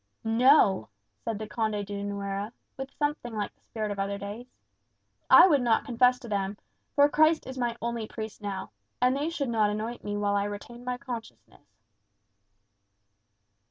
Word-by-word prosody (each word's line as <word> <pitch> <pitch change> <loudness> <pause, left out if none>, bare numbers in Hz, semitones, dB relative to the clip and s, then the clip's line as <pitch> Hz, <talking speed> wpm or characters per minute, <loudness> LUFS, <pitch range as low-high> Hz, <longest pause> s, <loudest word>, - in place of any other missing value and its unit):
"No," 225 - +4 0.3
said 225 -2 -2
the 215 - -5
Conde 215 -2 -1
de 200 0 -5
Nuera, 200 +1 -3 0.2
with 270 0 -6
something 290 -6 -2
like 210 -1 -3
the - - -41
spirit 215 -2 -4
of 200 - -4
other 200 +1 -1
days. 205 +5 -7 0.8
"I - - +10
would 295 -8 +4
not 235 -2 +2
confess 250 0 +4
to 240 - -9
them; 200 -1 -2 0.4
for 285 0 +7
Christ 310 +2 +3
is 260 - -7
my 240 -1 -1
only 235 -2 -2
priest 220 -1 -7
now. 200 - -4 0.3
And 250 +1 +3
they 290 +3 -1
should 290 -6 -2
not 220 -3 +2
anoint 220 +3 -4
me 205 0 -3
while 205 0 +1
I 200 0 +1
retained 235 +4 -7
my 250 0 -2
consciousness." 230 - -9
225 Hz, 165 wpm, -28 LUFS, 205-250 Hz, 0.8 s, I